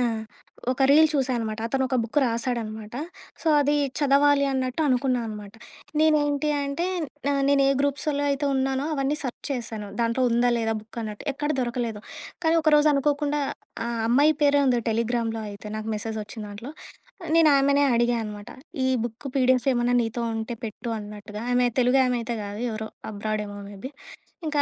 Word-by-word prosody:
ఆ! -, -, +2 dB, 0.7 s
ఒక 270 Hz, -, -1 dB
రీల్ 315 Hz, +2 st, +7 dB
చూశా 265 Hz, -3 st, +1 dB
అనమాట. 220 Hz, -1 st, -3 dB
అతనొక 265 Hz, +1 st, 0 dB
బుక్ 235 Hz, +6 st, -1 dB
రాశాడనమాట. 230 Hz, -2 st, -3 dB, 0.5 s
సో 325 Hz, -, +1 dB
అది 290 Hz, +1 st, +2 dB, 0.2 s
చదవాలి 285 Hz, 0 st, +4 dB
అన్నట్టు 260 Hz, +2 st, -1 dB
అనుకున్నా 255 Hz, -1 st, +2 dB
అనమాట. 210 Hz, -1 st, -8 dB, 0.5 s
నేనేంటి 300 Hz, -1 st, +3 dB
అంటే 280 Hz, +6 st, -2 dB, 0.4 s
న -, -, +3 dB, 0.2 s
నేనే 280 Hz, -1 st, +4 dB
గ్రూప్సుల్లో 285 Hz, +1 st, 0 dB
అయితే 280 Hz, +1 st, -1 dB
ఉన్నానో 265 Hz, +1 st, 0 dB
అవన్నీ 275 Hz, +1 st, 0 dB
సర్చ్ 255 Hz, -3 st, -6 dB
చేశాను. 225 Hz, -5 st, -4 dB
దాంట్లో 230 Hz, +2 st, +1 dB
ఉందా? 240 Hz, +1 st, +3 dB
లేదా? 225 Hz, -1 st, 0 dB
బుక్ 220 Hz, +2 st, -12 dB
అన్నట్టు. 210 Hz, +2 st, -6 dB
ఎక్కడ 295 Hz, +2 st, -3 dB
దొరకలేదు. 235 Hz, -3 st, -2 dB, 0.4 s
కానీ 320 Hz, -, +4 dB
ఒకరోజు 300 Hz, -1 st, +5 dB
అనుకోకుండా 290 Hz, +1 st, +1 dB, 0.5 s
ఆహ్, 235 Hz, -1 st, -2 dB
అమ్మాయి 290 Hz, +6 st, +5 dB
పేరే 285 Hz, 0 st, +5 dB
ఉంది 245 Hz, -2 st, +3 dB
టెలిగ్రామ్‌లో 230 Hz, 0 st, -1 dB
అయితే 205 Hz, +1 st, -10 dB
నాకు 215 Hz, +1 st, -5 dB
మెసేజొచ్చిందాంట్లో. 215 Hz, +2 st, -6 dB, 0.5 s
ఆహ్, 320 Hz, -, -5 dB
నేను 325 Hz, -2 st, +6 dB
ఆమెనే 280 Hz, +1 st, +4 dB
అడిగా 240 Hz, 0 st, +2 dB
అనమాట. 210 Hz, +1 st, -8 dB, 0.4 s
ఈ -, -, +2 dB, 0.2 s
బుక్ 240 Hz, +4 st, -6 dB
పీడిఎఫ్ 255 Hz, 0 st, +3 dB
ఏమన్నా 245 Hz, 0 st, +2 dB
నీతో 230 Hz, +1 st, -3 dB
ఉంటే 225 Hz, +1 st, -4 dB
పెట్టు 225 Hz, +2 st, -6 dB
అన్నట్టుగా. 210 Hz, 0 st, -8 dB
ఆమె 245 Hz, 0 st, +3 dB
తెలుగు 250 Hz, +2 st, +4 dB
ఆమె 250 Hz, -1 st, +1 dB
అయితే 235 Hz, 0 st, -3 dB
కాదు. 205 Hz, +1 st, -6 dB
ఎవరో 220 Hz, 0 st, -5 dB, 0.2 s
అబ్రాడ్ 215 Hz, +1 st, -2 dB
ఏమో 205 Hz, 0 st, -8 dB
మేబీ. 205 Hz, +8 st, -8 dB, 0.6 s
ఇంకా 295 Hz, -1 st, +1 dB
245 Hz, 160 wpm, -25 LUFS, 220-280 Hz, 0.7 s, రీల్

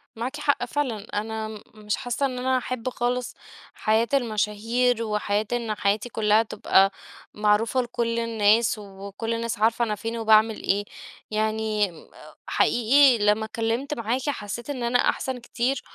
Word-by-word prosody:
مَعَاكِ 255 Hz, +6 st, -4 dB
حَقّ 285 Hz, -4 st, +1 dB
فِعْلًا، 245 Hz, -6 st, -2 dB
أنا 220 Hz, +1 st, -3 dB
م 215 Hz, -1 st, -9 dB
مِش 210 Hz, -1 st, -2 dB
حاسَّة 245 Hz, +3 st, -2 dB
إن 255 Hz, -2 st, -3 dB
أنا 260 Hz, +1 st, +1 dB
هاحب 255 Hz, -1 st, -3 dB
خالِص 245 Hz, 0 st, -2 dB, 0.4 s
حَياة 220 Hz, +2 st, +1 dB
المَشاهير 230 Hz, 0 st, +1 dB
وحياة 210 Hz, -1 st, -1 dB
إن 230 Hz, -3 st, -1 dB
حياتي 205 Hz, +4 st, 0 dB
كلها 215 Hz, -1 st, +3 dB
تبقى 195 Hz, -2 st, +3 dB, 0.4 s
معروفة 210 Hz, +4 st, +2 dB
لكل 235 Hz, -1 st, -2 dB
الناس 225 Hz, 0 st, +2 dB
وكل 200 Hz, +2 st, -6 dB
الناس 230 Hz, -2 st, -3 dB
عارفة 230 Hz, +2 st, +2 dB
أنا 215 Hz, -2 st, -2 dB
فين 225 Hz, +3 st, -5 dB
وباعمل 220 Hz, -1 st, +3 dB
إيه. 205 Hz, +1 st, +1 dB, 0.5 s
يَعْنِي 215 Hz, -1 st, 0 dB, 0.6 s
حَقِيقِي 255 Hz, +2 st, +4 dB
لَمّا 210 Hz, +1 st, +3 dB
اتْكَلِّمْت 230 Hz, +5 st, -2 dB
مَعَاكِ 245 Hz, +2 st, -2 dB
حسيت 235 Hz, -1 st, -5 dB
إن 260 Hz, -4 st, -3 dB
أنا 240 Hz, +1 st, +2 dB
أحسن 260 Hz, -1 st, 0 dB
كتير، 245 Hz, +2 st, -2 dB
225 Hz, 145 wpm, -25 LUFS, 215-245 Hz, 0.6 s, حَقِيقِي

